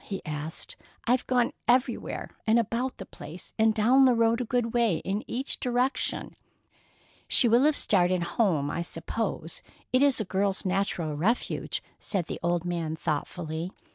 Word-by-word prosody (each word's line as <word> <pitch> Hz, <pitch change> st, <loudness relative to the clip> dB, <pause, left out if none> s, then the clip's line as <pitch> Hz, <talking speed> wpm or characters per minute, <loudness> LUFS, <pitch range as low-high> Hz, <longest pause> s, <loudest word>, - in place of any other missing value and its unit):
he 195 Hz, -, -4 dB
asked. 155 Hz, -, -5 dB, 0.3 s
"I've 250 Hz, +1 st, +2 dB
gone 245 Hz, -2 st, +2 dB
everywhere 250 Hz, +2 st, +1 dB, 0.2 s
about 235 Hz, +3 st, +1 dB
the 195 Hz, -, -7 dB
place; 155 Hz, +3 st, -10 dB
and 220 Hz, 0 st, +5 dB
down 245 Hz, +5 st, +5 dB
the 250 Hz, -2 st, +5 dB
road 230 Hz, +1 st, +3 dB
a -, -, -2 dB
good 235 Hz, -1 st, 0 dB
way 230 Hz, -8 st, +3 dB
in 200 Hz, +3 st, -1 dB
each 265 Hz, +3 st, -3 dB
direction." 250 Hz, +2 st, -1 dB, 0.9 s
"She 245 Hz, -, +4 dB
will 235 Hz, +4 st, +5 dB
have 305 Hz, -1 st, +4 dB
started 180 Hz, -6 st, +2 dB
home, 170 Hz, -7 st, +1 dB
I 170 Hz, -, -2 dB
suppose—it 170 Hz, +7 st, -3 dB
is 280 Hz, -3 st, +4 dB
a 215 Hz, -, -1 dB
girl's 195 Hz, +1 st, 0 dB
natural 185 Hz, -5 st, -1 dB
refuge," 205 Hz, +11 st, -1 dB, 0.2 s
said 190 Hz, -5 st, -2 dB
the -, -, -5 dB
old 175 Hz, 0 st, 0 dB
man 170 Hz, -3 st, -2 dB
thoughtfully. 160 Hz, +2 st, -3 dB
205 Hz, 150 wpm, -28 LUFS, 170-240 Hz, 0.9 s, and